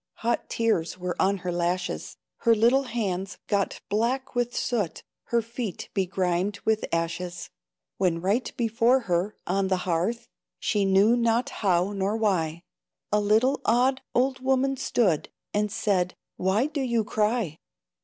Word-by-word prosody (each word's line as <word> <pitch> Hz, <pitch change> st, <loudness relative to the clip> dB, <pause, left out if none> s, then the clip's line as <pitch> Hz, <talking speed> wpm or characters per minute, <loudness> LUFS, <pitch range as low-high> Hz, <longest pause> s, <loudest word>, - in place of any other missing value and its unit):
Hot 235 Hz, -, 0 dB
tears 185 Hz, -7 st, 0 dB
were 180 Hz, -1 st, -3 dB
on 195 Hz, +1 st, +3 dB
her 180 Hz, -, 0 dB
lashes, 175 Hz, +1 st, -2 dB, 0.2 s
Her 230 Hz, -1 st, +4 dB
little 240 Hz, +5 st, +4 dB
hands 195 Hz, -6 st, -3 dB
got 200 Hz, -2 st, -1 dB
black 235 Hz, +6 st, 0 dB
with 245 Hz, -1 st, -1 dB
soot, 215 Hz, -9 st, -1 dB, 0.2 s
Her 235 Hz, -1 st, +1 dB
feet 230 Hz, -3 st, -5 dB
begrimed 185 Hz, +1 st, 0 dB
with 220 Hz, -1 st, +2 dB
ashes, 170 Hz, +1 st, -3 dB, 0.5 s
When 175 Hz, -3 st, +1 dB
right 200 Hz, +8 st, 0 dB
before 235 Hz, +2 st, +3 dB
her, 185 Hz, 0 st, -1 dB
on 195 Hz, +1 st, +1 dB
the 190 Hz, -1 st, +1 dB
hearth, 185 Hz, +7 st, -1 dB, 0.3 s
She 205 Hz, -3 st, +1 dB
knew 195 Hz, +4 st, +5 dB
not 235 Hz, 0 st, +1 dB
how 185 Hz, -1 st, +2 dB
nor 200 Hz, +2 st, 0 dB
why, 170 Hz, -6 st, 0 dB, 0.5 s
A 210 Hz, -, +3 dB
little 220 Hz, +7 st, +3 dB
odd 260 Hz, +3 st, +3 dB
old 260 Hz, +1 st, +2 dB
woman 265 Hz, +1 st, +1 dB
stood, 215 Hz, -, +1 dB, 0.2 s
And 210 Hz, 0 st, 0 dB
said, 185 Hz, -3 st, 0 dB, 0.2 s
"Why 190 Hz, +7 st, +1 dB
do 300 Hz, -1 st, -3 dB
you 235 Hz, -4 st, +1 dB
cry?" 210 Hz, -6 st, 0 dB
210 Hz, 145 wpm, -26 LUFS, 185-235 Hz, 0.5 s, knew